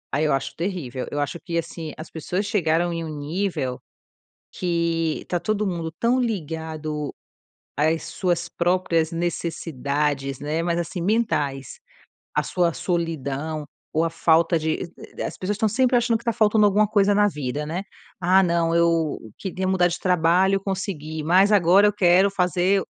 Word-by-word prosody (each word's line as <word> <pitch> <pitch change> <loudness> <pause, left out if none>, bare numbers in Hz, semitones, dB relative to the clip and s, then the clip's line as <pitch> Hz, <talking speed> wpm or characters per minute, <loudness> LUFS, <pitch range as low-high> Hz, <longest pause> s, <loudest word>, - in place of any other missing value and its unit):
Aí 150 +3 +2
eu 150 - +2
acho 135 - -2
terrível, 160 -9 -3
eu 145 - -3
acho 145 +4 -3
que 170 -1 -4
assim, 165 -2 -4
as 155 - -9
pessoas 180 +5 -3
chegaram 175 -5 +1
em 165 -1 -3
um - - -5
nível 150 -4 -2 0.7
que 170 -2 -1
tá 175 - -1
todo 215 +1 -1
mundo 170 -3 -3
tão 245 +2 +2
ligado 160 - -3 0.6
às 160 +3 +1
suas 175 -2 -1
próprias 170 -2 +1
necessidades, 150 -5 -2
né, 150 +3 -2
mas 170 0 0
assim 175 +1 -3
mentais, 170 - -1 0.6
a - - +3
sua 175 -2 +1
solidão, 160 -3 -2 0.3
ou 160 +1 +2
a 165 - 0
falta 165 +1 +3
de 160 +2 -2 0.2
e - - -3
as - - -4
pessoas 200 +2 -2
estão 220 +1 +2
sempre 250 +3 +2
achando 235 -1 +2
que 235 - -18
tá 235 - +1
faltando 215 -1 +4
alguma 205 +1 +4
coisa 205 -1 +3
na 205 0 +4
vida, 150 -4 -3
né. 170 +5 -3 0.4
"Ah 185 +2 +5
não 170 -2 +1
eu 165 -2 +2 0.2
queria 190 -1 -3
mudar 185 -2 +3
de 175 +1 -3
trabalho 180 +2 +3
eu - - -2
consegui 185 -6 -4
mas 185 +5 +5
agora 195 0 +5
eu - - +1
quero 190 0 +4
fazer 185 +1 +2
170 Hz, 165 wpm, -23 LUFS, 160-190 Hz, 0.7 s, Ah